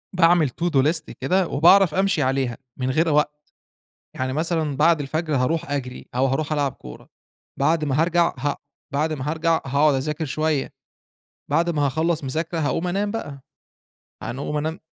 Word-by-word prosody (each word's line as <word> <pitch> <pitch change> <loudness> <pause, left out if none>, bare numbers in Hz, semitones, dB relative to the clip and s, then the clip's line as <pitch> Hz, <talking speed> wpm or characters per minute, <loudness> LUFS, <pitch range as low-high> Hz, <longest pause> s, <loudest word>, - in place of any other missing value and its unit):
باعمل 165 -4 +4
to 170 - -5
do 135 -5 +3
list 160 -1 0
كده 180 +7 +1
وباعرف 175 +3 +5
أمشي 190 -6 +2
عليها 130 -2 0 0.2
من 130 0 -2
غير 160 +4 +2
وقت. 150 0 +1 0.8
يعني 130 0 -2
مثلًا 155 -1 -1
بعد 160 +2 +4
الفجر 155 +1 -2
هاروح 160 +5 0
أجري، 130 -3 -4
أو 130 +2 +2
هاروح 145 +3 -1
ألعب 145 -3 0
كورة 60 0 -12 0.5
بعد 155 +2 +2
ما 140 - -1
هرجع 170 0 +2
ه 140 +2 -1 0.4
بعد 155 +3 0
ما 140 -1 -4
هارجع، 165 +1 +1
هاقعد 140 +2 +3
أذاكر 150 +4 -2
شوية، 155 0 -1 0.8
بعد 170 +1 +2
ما 145 -3 +1
هاخلّص 160 +2 0
مذاكرة 160 +5 -3
هاقوم 160 +4 -1
أنام 200 +3 -1
بقى. 145 -11 -6 0.8
يعنى 130 - -5
أقوم 150 +1 -3
أنام 155 +2 -3
155 Hz, 165 wpm, -23 LUFS, 140-165 Hz, 0.8 s, وباعرف